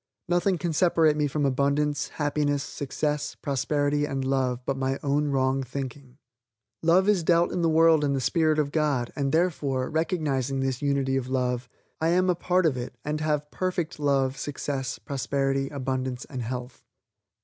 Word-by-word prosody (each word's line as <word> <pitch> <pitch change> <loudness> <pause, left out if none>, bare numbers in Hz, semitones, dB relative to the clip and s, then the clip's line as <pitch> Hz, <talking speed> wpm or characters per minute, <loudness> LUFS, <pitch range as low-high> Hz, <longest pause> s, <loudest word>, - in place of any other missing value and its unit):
Nothing 175 +2 +2
can 170 -1 -2
separate 160 -2 +3
me 150 -1 +1
from 145 +1 -1
abundance, 140 +2 +1
happiness, 145 -1 -1
success, 145 +1 -3
prosperity 145 +1 0
and 135 -2 -3
love, 130 -2 0
but 135 - 0
my 135 0 -1
own 145 +1 +1
wrong 135 -1 +1
thinking. 130 0 -7 0.6
Love 175 +4 +4
is 205 -4 +4
dealt 170 +1 +3
in 175 - -1
the 165 - +3
world 160 -1 +5
in 140 -1 +1
the 135 - 0
spirit 155 +3 +2
of 145 -2 0
God 145 -6 0
and, 140 -1 -1
therefore, 145 -6 0
recognizing 150 -5 0
this 135 -1 -1
unity 140 -2 +1
of 130 -1 -3
love, 125 -1 -1 0.3
I 160 - +2
am 180 +2 +3
a - - 0
part 180 +1 +1
of 145 -5 +2
it 125 0 -5
and 150 +1 -2
have 150 -1 -1
perfect 180 -3 -2
love, 135 -2 +1
success, 135 -2 -3
prosperity, 135 0 -1
abundance 130 -2 -3
and 130 -3 -6
health. 125 +1 -6
145 Hz, 170 wpm, -26 LUFS, 135-155 Hz, 0.6 s, world